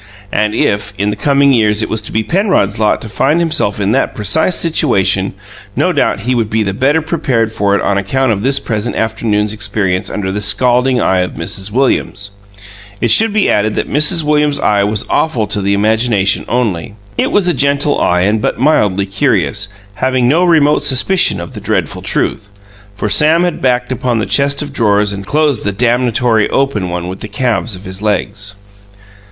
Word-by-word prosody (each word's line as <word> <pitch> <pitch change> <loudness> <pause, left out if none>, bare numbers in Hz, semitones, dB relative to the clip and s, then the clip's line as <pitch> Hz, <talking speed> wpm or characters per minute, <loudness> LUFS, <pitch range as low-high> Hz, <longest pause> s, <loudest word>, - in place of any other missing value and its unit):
And 105 0 0
if, 100 -1 0
in 100 +2 0
the - - -3
coming 140 +4 +2
years 110 -2 +2
it - - -2
was 110 - -2
to 110 - -8
be 110 - 0
Penrod's 170 - 0
lot 105 -1 +1
to - - -7
find 150 +9 +1
himself 155 -12 -1
in 100 0 0
that - - 0
precise 135 - +1
situation, 150 - +1 0.4
no - - +1
doubt - - 0
he 125 +3 -1
would 115 -4 -1
be 110 0 0
the 100 -1 -2
better 145 +9 +1
prepared 135 -9 -1
for 100 -2 0
it - - -1
on 100 0 +1
account 130 +6 0
of 100 -2 -1
this 135 +4 +1
present 110 -3 -3
afternoon's 110 -2 -1
experience 100 -3 -1
under 95 -2 -3
the 105 +2 -3
scalding 125 +4 +1
eye 95 -4 +1
of 90 0 -2
Mrs. 95 +5 -4
Williams. 105 -4 -1 0.7
It 120 - +1
should 225 0 +4
be 210 -1 +1
added 105 +1 +1
that - - -3
Mrs. 150 +3 +2
Williams's 150 -1 +1
eye 100 -1 +2
was 105 +1 -1
awful 140 -9 0
to 105 0 -2
the 100 +1 +1
imagination 105 -2 +1
only. 110 -5 -2 0.2
It - - 0
was 200 -3 +2
a 175 - +2
gentle 140 +1 +1
eye 90 0 +2
and 105 +3 +1
but - - -1
mildly 105 -9 +2
curious, 100 - 0 0.3
having 130 +2 0
no 160 +7 +3
remote 155 -5 +3
suspicion 145 - +2
of 85 - -8
the - - -8
dreadful - - -2
truth, 100 - -1 0.5
for 105 - -3
Sam 155 - +4
had 175 -2 -2
backed 125 -1 0
upon 125 -1 -1
the 110 - -1
chest 140 +1 +1
of 145 -1 -8
drawers 105 -4 +1
and 100 -1 -7
closed 150 -5 +1
the 105 - -1
damnatory 120 0 +1
open 125 -10 -1
one 90 0 -4
with 95 +1 -6
the - - -6
calves 120 0 -1
of 95 - -12
his 95 +1 -6
legs. 105 -1 -2
110 Hz, 195 wpm, -13 LUFS, 100-140 Hz, 0.7 s, should